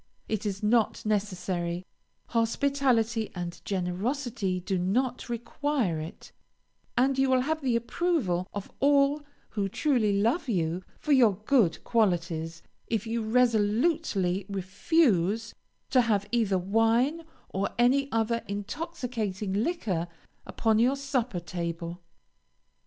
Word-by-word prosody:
It 215 -1 -2
is 200 +1 -4
not 220 +1 +2
necessary; 185 -4 -1 0.4
hospitality 235 -2 +1
and 175 -1 -5
generosity 195 +2 -2
do 185 +1 -2
not 245 +8 0
require 235 - -1
it, 155 +2 -9 0.7
and 265 +2 +3
you 270 0 +3
will 260 -1 +4
have 315 +4 -1
the 255 -4 +1
approval 235 - 0
of 200 -1 -6
all 280 +1 +4 0.3
who 200 -2 -2
truly 215 -5 +1
love 245 - +1
you 175 -3 0 0.2
for 300 - -3
your 240 -8 +6
good 215 - +3
qualities, 170 -7 0 0.2
if 225 -1 -1
you 230 +1 -1
resolutely 220 - +1
refuse 200 - +1 0.4
to 255 - +6
have 205 -4 +1
either 220 -5 +2
wine 225 - +2 0.3
or 195 +1 -1
any 270 +3 +3
other 230 +1 +1
intoxicating 210 - -4
liquor 205 - -1 0.4
upon 220 -1 +1
your 250 +4 +4
supper 255 -7 -1
table. 170 0 -5
220 Hz, 115 wpm, -28 LUFS, 190-255 Hz, 0.7 s, your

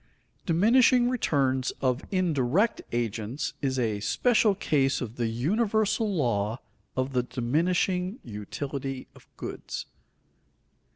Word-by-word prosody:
_Diminishing 240 +7 +5
returns 135 - +1
of 130 0 0
indirect 180 - +1
agents 115 +2 -2
is 135 -2 0
a 110 -4 0
special 220 - +3
case 140 -7 +1
of 120 -1 -6
the 120 -1 0
universal 210 - +1
law 115 - 0 0.4
of 130 +1 -1
the 125 - +3
diminishing 175 - 0
utility 135 +5 -5
of - - -18
goods. - - -6
140 Hz, 105 wpm, -27 LUFS, 120-190 Hz, 0.4 s, Diminishing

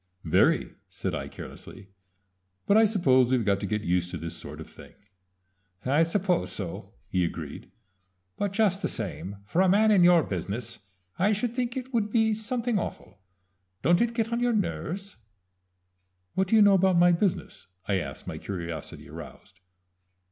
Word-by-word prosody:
"Very," 80 - +2 0.2
said - - -4
I - - -3
carelessly. 95 +1 -11 0.8
"But 200 - +3
I 220 +1 +7
suppose 130 - +3
we've 125 -3 +2
got 100 -1 +2
to 100 - -3
get 105 +1 -2
used 90 -1 0
to 90 - -5
this 85 +1 -4
sort 75 -2 -9
of 80 - -8
thing." - - -14 0.9
"I 140 +5 +3
suppose 180 +2 +1
so," 90 -5 -6
he 90 - 0
agreed; 85 - -5 0.7
"but 205 -1 -2
just 200 -2 +1
the - - 0
same 100 -3 -4
for 165 - +1
a 190 - +4
man 215 +3 +4
in 195 -4 +5
your 175 -2 +6
business 110 +5 -4 0.4
I 200 +4 +3
should 230 +3 -2
think 245 0 -2
it 260 0 -6
would 215 -3 +1
be 220 0 +2
something 225 +1 -1
awful. - - -7 0.6
Don't 175 +3 +4
it 235 0 0
get 230 0 -1
on 235 - 0
your 245 0 +2
nerves?" 200 -2 -3 1.2
"What 190 0 +1
do 225 - +3
you 215 - +7
know 200 -1 +6
about 190 -1 +4
my 175 +1 +6
business?" 175 +2 -1 0.2
I 100 -2 +1
asked, 70 -6 -7
my - - -6
curiosity 85 -5 -6
aroused. 95 -2 -11
175 Hz, 170 wpm, -27 LUFS, -, 1.2 s, I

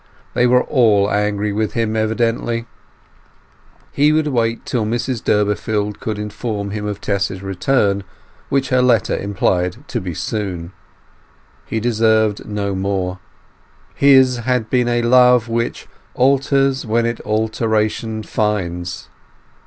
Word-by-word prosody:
They 125 - +3
were 125 +1 +4
all 105 -6 +3
angry 105 0 0
with 110 +1 -1
him, 115 -2 -1
evidently. 115 +1 -1 1.3
He 145 +2 +3
would 155 0 +2
wait 115 -5 -1
till 120 -3 -1
Mrs 120 +2 -2
Durbeyfield 105 0 0
could 110 -2 -4
inform 105 -1 -4
him 105 0 -4
of 105 -1 -4
Tess's 100 -2 -2
return, 100 +1 0 0.5
which 135 -1 0
her 130 -1 +3
letter 120 -5 +2
implied 90 -3 -1
to - - -2
be 90 -3 -5
soon. 95 -5 -4 1.0
He 110 - -2
deserved 110 -2 +1
no 100 -1 -2
more. 95 -1 -2 0.7
His 130 -2 +5
had 120 -1 -1
been 125 -2 +2
a 120 0 +1
love 125 -1 +5
"which 115 0 -2 0.3
alters 135 0 +2
when 115 +1 0
it 115 0 -2
alteration 110 0 -1
finds". 90 -6 -2
110 Hz, 125 wpm, -18 LUFS, 100-120 Hz, 1.3 s, His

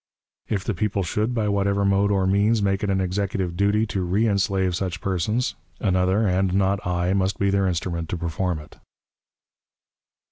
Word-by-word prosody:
"If 100 -3 -1
the 110 - -1
people 100 +1 -1
should, 110 +7 -1
by 110 -3 0
whatever 100 0 +1
mode 100 +1 +3
or 100 -2 +2
means, 100 +4 +3
make 95 -1 +1
it 105 - 0
an 95 -1 +1
executive 95 -1 -2
duty 100 +3 +2
to 100 -3 -2
reënslave 95 -1 +1
such 90 0 -3
persons, 105 +7 -1 0.3
another, 95 +2 +2
and 95 0 +1
not 100 0 +2
I, 90 +1 0
must 95 0 0
be 100 0 +1
their 100 -1 +2
instrument 85 -2 -2
to 90 - -2
perform 85 +1 -2
it." 75 0 -12
95 Hz, 170 wpm, -23 LUFS, 90-100 Hz, 0.3 s, mode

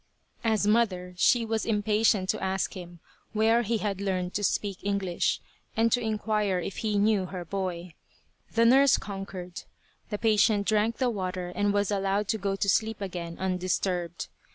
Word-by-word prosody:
As 220 -3 +2
mother, 200 -5 +1
she 230 +6 +3
was 225 0 -1
impatient 210 -2 +2
to - - -1
ask 190 0 -1
him 175 -2 -9 0.3
where 225 +2 +3
he 230 0 0
had 200 -2 -3
learned 185 -2 -2
to 205 - -2
speak 200 -1 0
English, 195 -3 0 0.4
and 230 +1 +3
to 245 - +2
inquire 215 -3 0
if 180 +2 -4
he 215 -2 -1
knew 205 -2 +2
her 180 -1 -6
boy. 180 -2 -4 0.6
The 230 0 +4
nurse 270 +3 +6
conquered. 190 -3 -7 0.5
The 210 - -2
patient 215 -1 +3
drank 215 +2 +1
the 255 -2 +1
water 185 -3 -3
and 205 +3 0
was 205 0 +1
allowed 195 +1 0
to 220 - 0
go 195 0 -1
to 200 - -1
sleep 220 +2 +1
again 175 -4 -5
undisturbed. 180 -2 -2
200 Hz, 165 wpm, -28 LUFS, 185-220 Hz, 0.6 s, nurse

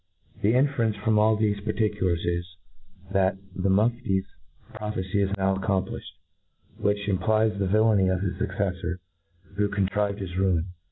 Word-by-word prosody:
The 110 +4 +3
inference 125 -5 +2
from 105 +1 +1
all 110 0 +4
thefe 105 -2 0
particulars 105 -5 0
is, 85 0 -2 0.6
that 95 0 +2 0.2
the 95 +1 0
Mufti's 105 -1 +2 0.5
prophecy 100 -2 -2
is; 100 - +1
now 95 0 +2
accomplifhed:: 95 0 -1 0.8
which 100 0 0
implies 105 +3 +2
the 100 - +1
villany 105 -1 +4
of 95 -1 +1
his 95 -1 -1
fucceflbr, 95 -3 -2 0.6
who 105 0 +2
contrived 100 0 0
his 95 -3 -6
ruin. 95 -2 +1
100 Hz, 135 wpm, -26 LUFS, 95-105 Hz, 0.8 s, all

